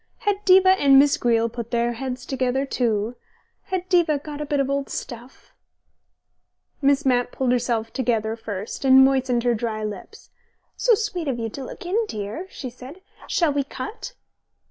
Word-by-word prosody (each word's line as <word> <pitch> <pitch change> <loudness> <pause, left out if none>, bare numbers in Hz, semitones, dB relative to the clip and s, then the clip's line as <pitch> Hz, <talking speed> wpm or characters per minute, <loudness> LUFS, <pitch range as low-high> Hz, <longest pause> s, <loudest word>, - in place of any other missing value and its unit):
Had 410 -1 -1
Diva 375 0 +6
and 285 -8 +5
Miss 280 +1 +5
Greele 230 -1 +2
put 235 0 -7
their 235 0 0
heads 250 +1 -5
together 265 0 -1
too? 230 -3 -1 0.5
Had 370 -3 -3
Diva 345 -5 +3
got 295 +1 -7
a 300 - -4
bit 285 0 0
of 275 - +1
old 275 0 -2
stuff...? 240 +2 -8 1.3
Miss 280 +1 +2
Mapp 245 -2 +2
pulled 260 -2 0
herself 235 -2 -1
together 225 -4 0
first 210 0 -6
and 265 0 +7
moistened 260 -3 +1
her 245 -1 +2
dry 220 -1 -3
lips. 210 - -8 0.4
"So 480 -2 +3
sweet 400 -7 -3
of 260 -3 -1
you 225 -1 -3
to 270 +5 -7
look 260 - -9
in, 410 +6 +1
dear," 215 - -5
she 255 -8 -7
said. 260 +9 -12 0.3
"Shall 330 -5 +1
we 285 0 0
cut?" 275 - -7
260 Hz, 170 wpm, -23 LUFS, 235-295 Hz, 1.3 s, and